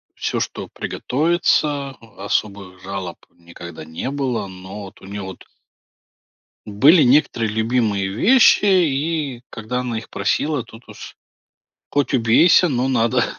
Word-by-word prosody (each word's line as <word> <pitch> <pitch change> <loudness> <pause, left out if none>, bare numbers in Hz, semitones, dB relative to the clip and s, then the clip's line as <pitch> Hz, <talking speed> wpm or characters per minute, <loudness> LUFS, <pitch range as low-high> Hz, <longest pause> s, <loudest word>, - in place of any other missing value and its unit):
всё, - - -2
что - - -5
приготовится, 150 -1 0 0.3
особых 100 -2 -3
жалоб 95 -2 -6
никогда 85 -1 -11
не 80 +10 -6
было. 135 -7 -2
Но 95 +2 -10
вот, 95 +2 -15
у - - -13
нее 100 +1 -7
вот 95 -1 -9 1.2
Были 140 - +5
некоторые 120 -4 +2
любимые 110 -3 0
вещи 210 - +4
и 155 -7 0
когда 115 +2 -4
она 120 -3 -3
их 115 - -14
просила 145 -4 -1
тут 115 +1 -16
уж, - - -11 0.8
хоть 145 -1 0
убейся, 130 +10 +4
но 130 -2 -1
надо 115 -3 +1
115 Hz, 125 wpm, -20 LUFS, 100-140 Hz, 1.2 s, Были